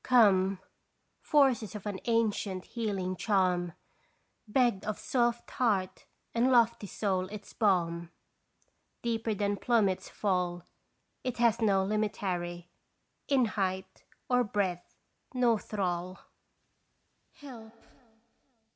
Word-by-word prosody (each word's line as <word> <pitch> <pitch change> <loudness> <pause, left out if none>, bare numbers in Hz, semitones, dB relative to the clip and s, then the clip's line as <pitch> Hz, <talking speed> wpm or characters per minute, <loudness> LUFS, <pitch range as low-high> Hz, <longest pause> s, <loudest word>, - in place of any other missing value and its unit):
Come! 195 -6 +4 0.6
forces 260 - +2
of 210 - -7
an 200 -2 -3
ancient 215 -5 0
"healing 195 -6 -3
charm/ 180 -3 +1 0.7
Begged 235 -3 +2
of 215 0 -3
soft 240 -2 0
heart 200 -7 0 0.3
and 240 +3 +3
lofty 235 -3 +3
soul 190 -2 -1
its 205 +1 -9
balm. 170 -5 +1 0.9
Deeper 225 -2 -1
than 205 0 0
plummets 210 -6 +1
fall 180 -3 -1 0.6
It 255 -2 -3
has 235 -1 +3
no 195 -3 +3
limitary, 185 -5 -2 0.6
In 270 -3 +3
height 190 -3 -3 0.2
or 250 -1 +3
breadth 195 -5 -2 0.4
no 240 -3 +3
thrall: 185 -3 -3 1.2
Help! 240 -7 -11
205 Hz, 100 wpm, -30 LUFS, 185-230 Hz, 1.2 s, Come